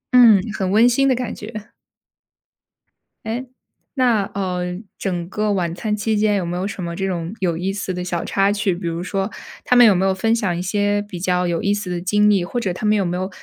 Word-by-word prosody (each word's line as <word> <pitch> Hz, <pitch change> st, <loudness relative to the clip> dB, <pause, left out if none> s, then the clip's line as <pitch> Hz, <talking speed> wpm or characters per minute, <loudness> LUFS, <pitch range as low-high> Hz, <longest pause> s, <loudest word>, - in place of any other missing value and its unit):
嗯， 230 Hz, -5 st, +8 dB, 0.2 s
很 190 Hz, -1 st, -1 dB
温 220 Hz, +5 st, +5 dB
馨 270 Hz, +3 st, +3 dB
的 260 Hz, -, +3 dB
感 245 Hz, -2 st, -3 dB
觉。 215 Hz, 0 st, -9 dB, 1.5 s
诶， 235 Hz, +4 st, -4 dB, 0.5 s
那， 245 Hz, -6 st, +2 dB
呃， 180 Hz, -2 st, -2 dB, 0.2 s
整 175 Hz, -2 st, -3 dB
个 210 Hz, +1 st, 0 dB
晚 175 Hz, -4 st, -1 dB
餐 210 Hz, +4 st, -2 dB
期 215 Hz, +1 st, -1 dB
间 210 Hz, 0 st, +2 dB
有 190 Hz, -3 st, -1 dB
没 175 Hz, +1 st, -3 dB
有 185 Hz, +2 st, -2 dB
什 195 Hz, -2 st, -6 dB
么 170 Hz, 0 st, -4 dB
这 195 Hz, +3 st, -2 dB
种 175 Hz, -1 st, -3 dB
有 175 Hz, -3 st, 0 dB
意 185 Hz, +3 st, -1 dB
思 195 Hz, -1 st, -4 dB
的 180 Hz, 0 st, -4 dB
小 175 Hz, -2 st, -3 dB
插 195 Hz, 0 st, +2 dB
曲， 205 Hz, -3 st, 0 dB
比 175 Hz, +1 st, -7 dB
如 165 Hz, 0 st, -3 dB
说 195 Hz, +3 st, -2 dB, 0.3 s
他 250 Hz, -, +3 dB
们 245 Hz, -, +9 dB
有 210 Hz, -4 st, +6 dB
没 185 Hz, +2 st, +1 dB
有 190 Hz, -, +2 dB
分 225 Hz, +4 st, +1 dB
享 200 Hz, -7 st, -1 dB
一 -, -, -3 dB
些 205 Hz, +2 st, 0 dB
比 205 Hz, -4 st, -8 dB
较 180 Hz, -1 st, +1 dB
有 170 Hz, -1 st, -1 dB
意 200 Hz, -, +2 dB
思 205 Hz, -2 st, -4 dB
的 175 Hz, -1 st, -3 dB
经 210 Hz, +3 st, +3 dB
历， 200 Hz, -4 st, +3 dB
或 220 Hz, +8 st, -3 dB
者 190 Hz, -6 st, -2 dB
他 200 Hz, -, -5 dB
们 210 Hz, 0 st, +3 dB
有 195 Hz, -, +1 dB
没 175 Hz, 0 st, -2 dB
有 185 Hz, +1 st, -2 dB
195 Hz, 255 characters per minute, -20 LUFS, 180-215 Hz, 1.5 s, 们